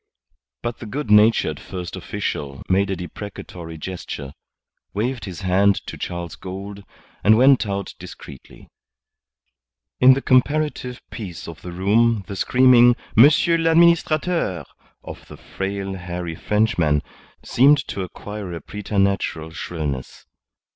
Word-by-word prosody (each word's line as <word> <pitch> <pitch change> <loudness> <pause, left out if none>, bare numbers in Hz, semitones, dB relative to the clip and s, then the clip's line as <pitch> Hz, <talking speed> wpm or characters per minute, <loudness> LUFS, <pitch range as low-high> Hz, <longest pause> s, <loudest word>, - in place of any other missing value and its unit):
But 120 -1 -4
the 115 - -8
good 130 0 -4
natured 105 -8 +4
First 90 -2 -7
Official 70 -1 -5
made 100 +2 +2
a 95 - -1
deprecatory 90 -2 -8
gesture, 75 -5 -7 0.6
waved 120 +3 -2
his 95 -1 -8
hand 95 +2 +3
to - - -7
Charles 85 -2 -5
Gould, 100 +2 -8 0.4
and 110 +1 +6
went 130 -2 +5
out 100 -1 -4
discreetly. 70 -3 -12 1.3
In 130 +1 +7
the 135 - -2
comparative 130 -1 +1
peace 95 -7 -7
of 80 -2 -10
the 90 - -8
room 105 +4 +2
the 100 - -7
screaming 120 +2 +5 0.2
"Monsieur 150 +7 +6
l'Administrateur" 165 - +2 0.4
of - - -10
the - - -11
frail, 95 0 -5
hairy 90 -2 -5
Frenchman 85 -6 +1 0.4
seemed 140 +4 +5
to 100 - -4
acquire 100 +1 -7
a 85 - -5
preternatural 100 -6 -2
shrillness. 75 -7 -5
100 Hz, 120 wpm, -21 LUFS, 90-120 Hz, 1.3 s, In